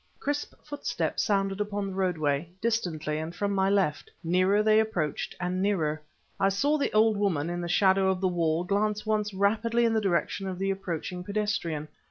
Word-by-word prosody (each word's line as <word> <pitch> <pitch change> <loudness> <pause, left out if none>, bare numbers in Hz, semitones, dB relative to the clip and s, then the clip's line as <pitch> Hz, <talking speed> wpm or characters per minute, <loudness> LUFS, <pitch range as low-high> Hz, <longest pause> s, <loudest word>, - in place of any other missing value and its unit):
Crisp 290 +1 -3
footsteps 290 - -2
sounded 195 -2 0
upon 205 -1 -2
the 195 - -5
roadway; 165 -5 0
distantly, 170 -10 -1
and 160 +2 -5
from 200 +1 -1
my 190 0 +2
left. 195 -7 +1
Nearer 185 +5 +3
they 215 0 +5
approached 175 -9 -1
and 180 +1 -1
nearer. 160 -6 0 0.4
I 195 - +4
saw 285 +10 +1
the 280 - 0
old 215 0 +4
woman, 170 -6 0
in 175 0 -3
the 175 - -3
shadow 190 +1 +4
of 190 -1 0
the 190 - +1
wall, 170 -2 +1
glance 210 +3 0
once 215 -1 0
rapidly 225 +4 +1
in 230 - +2
the 220 - +2
direction 195 0 0
of 185 -1 -4
the 195 +1 0
approaching 180 -2 -4
pedestrian. 200 -7 -2
195 Hz, 185 wpm, -28 LUFS, 175-210 Hz, 0.4 s, they